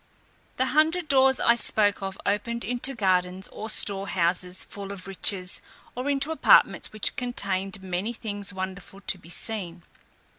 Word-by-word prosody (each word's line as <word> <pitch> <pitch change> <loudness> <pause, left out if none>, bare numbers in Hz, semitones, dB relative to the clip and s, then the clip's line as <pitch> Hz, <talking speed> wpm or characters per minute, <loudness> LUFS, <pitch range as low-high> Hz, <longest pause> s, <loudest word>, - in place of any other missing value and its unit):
The 260 - +2
hundred 315 +3 +2
doors 265 -1 +5
I 235 - +5
spoke 210 -4 +2
of 195 0 -5
opened 235 +4 -1
into 250 +2 -1
gardens 185 -3 0
or 220 - -7
store 200 -2 0
houses 180 +1 0
full 200 -1 -8
of 195 -2 -9
riches, 195 -1 +1 0.3
or 255 +3 -3
into 280 +2 +1
apartments 320 - +4
which 215 -1 -2
contained 195 -6 -2
many 185 +4 -2
things 205 -3 -2
wonderful 190 0 -7
to 190 - +1
be 170 - -15
seen. 180 -3 -3
200 Hz, 150 wpm, -26 LUFS, 185-235 Hz, 0.3 s, doors